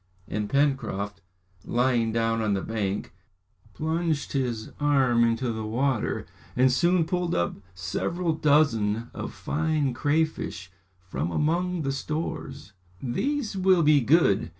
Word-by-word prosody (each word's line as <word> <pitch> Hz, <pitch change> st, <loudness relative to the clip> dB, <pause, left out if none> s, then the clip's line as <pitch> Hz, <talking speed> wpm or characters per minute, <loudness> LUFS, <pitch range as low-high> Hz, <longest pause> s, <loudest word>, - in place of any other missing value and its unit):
And 105 Hz, -1 st, -3 dB
Pencroft, 120 Hz, -8 st, 0 dB, 0.4 s
lying 120 Hz, -2 st, +1 dB
down 115 Hz, 0 st, +1 dB
on 105 Hz, -2 st, +1 dB
the 95 Hz, -, -2 dB
bank, 105 Hz, -3 st, -3 dB, 0.6 s
plunged 160 Hz, -1 st, -1 dB
his 120 Hz, -5 st, -2 dB
arm 135 Hz, -5 st, +3 dB
into 115 Hz, +1 st, +1 dB
the 110 Hz, 0 st, -4 dB
water, 120 Hz, +2 st, -1 dB, 0.3 s
and 130 Hz, +1 st, +4 dB
soon 170 Hz, +5 st, +3 dB
pulled 180 Hz, 0 st, -1 dB
up 85 Hz, 0 st, 0 dB, 0.2 s
several 165 Hz, -, -1 dB
dozen 120 Hz, -8 st, +2 dB
of -, -, -5 dB
fine 155 Hz, -3 st, -1 dB
crayfish 145 Hz, -, -1 dB, 0.3 s
from 90 Hz, -4 st, -4 dB
among 170 Hz, -, 0 dB
the 135 Hz, -, 0 dB
stores. 140 Hz, -4 st, -4 dB, 0.3 s
"These 230 Hz, -, -2 dB
will 185 Hz, -2 st, +4 dB
be 150 Hz, -1 st, +5 dB
good!" 115 Hz, -, +3 dB
135 Hz, 125 wpm, -26 LUFS, 110-155 Hz, 0.6 s, be